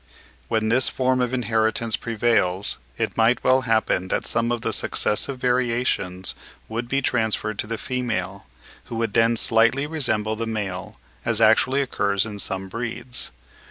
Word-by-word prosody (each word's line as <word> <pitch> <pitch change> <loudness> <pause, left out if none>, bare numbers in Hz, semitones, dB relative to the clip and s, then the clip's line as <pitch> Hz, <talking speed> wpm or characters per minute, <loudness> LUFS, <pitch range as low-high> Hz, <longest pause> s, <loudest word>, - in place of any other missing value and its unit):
When 110 +4 0
this 125 +3 +3
form 130 -1 +1
of 125 -1 0
inheritance 115 -2 +1
prevails, 105 -5 +1 0.2
it - - -2
might 115 +2 +3
well 130 +1 +4
happen 110 -4 +2
that - - -1
some 115 +1 0
of 120 -1 -1
the - - -1
successive 130 +5 -1
variations 120 -7 0 0.3
would 115 +2 -4
be 135 +2 0
transferred 110 -3 0
to - - -2
the 115 0 -3
female, 125 - -3 0.4
who - - -7
would 115 -2 -1
then 115 0 +3
slightly 115 +6 +3
resemble 110 -9 0
the 115 +1 -3
male, 105 -2 -4 0.3
as 115 -2 0
actually 120 +5 +4
occurs 100 -6 0
in 105 -2 -7
some 95 -1 -3
breeds. 120 +4 -3
115 Hz, 155 wpm, -23 LUFS, 110-125 Hz, 0.4 s, well